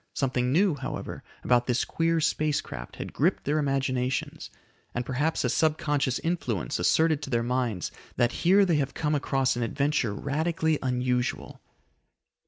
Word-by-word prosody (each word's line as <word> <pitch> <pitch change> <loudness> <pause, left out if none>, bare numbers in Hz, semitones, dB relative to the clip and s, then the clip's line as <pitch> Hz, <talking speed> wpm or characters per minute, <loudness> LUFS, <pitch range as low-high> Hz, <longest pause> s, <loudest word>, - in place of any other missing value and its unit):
Something 125 -2 0
new, 180 +4 +3
however, 135 -2 -6 0.2
about 120 -1 +3
this 125 -1 +1
queer 165 0 +1
space 155 -1 +1
craft - - -8
had - - -7
gripped - - +1
their 150 +2 +1
imaginations, 135 -2 -1 0.5
and 120 0 -2
perhaps 145 +6 0
a - - +1
subconscious 145 -4 +1
influence 125 - -2
asserted 160 -2 +3
to - - -6
their 120 -2 +1
minds 120 -6 -1 0.2
that 120 0 +2
here 195 +3 +5
they 170 -4 +2
have 140 -2 -1
come 150 -1 0
across 135 -2 +1
an 120 - -3
adventure 135 -2 0
radically 160 +4 0
unusual. 125 -1 -1
135 Hz, 150 wpm, -27 LUFS, 125-155 Hz, 0.5 s, here